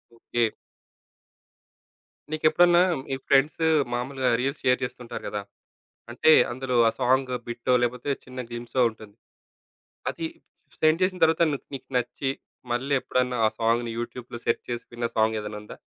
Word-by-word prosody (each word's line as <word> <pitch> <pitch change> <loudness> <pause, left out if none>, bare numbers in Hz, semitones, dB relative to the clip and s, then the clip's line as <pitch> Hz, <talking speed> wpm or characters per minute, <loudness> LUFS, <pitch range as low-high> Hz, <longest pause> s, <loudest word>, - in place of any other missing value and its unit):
Okay. 115 0 0 1.8
నీకెప్పుడన్నా 165 +3 +4 0.3
ఈ - - +1
friends 140 +4 +3 0.3
మామూలుగా 130 +1 -1
reels 135 +4 -2
share 125 0 +3
చేస్తుంటారు 125 -1 -6
గదా! - - -3 0.7
అంటే 140 +6 +4 0.2
అందులో 130 +1 -3
ఆ - - -2
సాంగ్ 130 +1 +2 0.2
బిట్టో, 120 +2 -1
లేకపోతే 125 +3 -1
చిన్న 130 -1 -7
గ్లిమ్‌‌సో 120 +2 -2
ఉంటుంది. 110 -2 -14 1.0
అది 165 - -4 0.5
సెండ్ 155 +3 +3
చేసిన 185 -1 0
తర్వాత, 160 +1 +3
నీకు 140 - -5
నీకు 130 -1 -8
నచ్చి 135 +2 -2 0.4
మళ్ళీ 130 +4 0
ఎప్పుడన్నా 125 -1 0
ఆ - - +5
సాంగ్‌ని 115 +1 +1
యూట్యూబ్‌లో 120 0 -6
సెర్చ్ 115 - 0
చేసి 120 0 -3
విన్న 120 0 -2
సాంగ్ 110 0 +3
ఏదన్నా 105 0 -6
ఉందా? 105 - -11
125 Hz, 135 wpm, -26 LUFS, 120-135 Hz, 1.8 s, ఆ